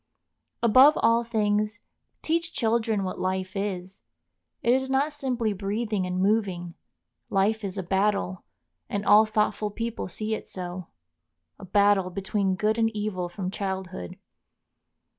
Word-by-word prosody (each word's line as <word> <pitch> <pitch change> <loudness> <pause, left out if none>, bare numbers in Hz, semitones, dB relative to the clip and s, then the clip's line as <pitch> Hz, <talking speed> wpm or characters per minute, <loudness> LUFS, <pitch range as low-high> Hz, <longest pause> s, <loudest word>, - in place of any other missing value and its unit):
Above 260 +6 +7
all 230 +1 +4
things, 215 -1 0 0.4
teach 335 +1 -1
children 225 -3 +1
what 185 - -4
life 185 +1 -2
is. 195 -1 -4 0.6
It 235 - +4
is 265 0 0
not 275 +3 +1
simply 250 -6 -1
breathing 205 0 -2
and 180 0 -2
moving. 190 -4 0 0.6
Life 210 +3 +1
is 195 0 -4
a 190 - -2
battle, 190 0 0 0.5
and 200 0 -2
all 215 +1 +7
thoughtful 215 0 0
people 230 +2 -4
see 215 +4 -3
it - - -5
so,—a 85 - -10
battle 200 -1 +3
between 195 +1 -1
good 215 +3 0
and 225 0 +3
evil 200 -4 -2
from 185 +1 -4
childhood. 190 - -5
205 Hz, 130 wpm, -26 LUFS, 185-225 Hz, 0.6 s, Above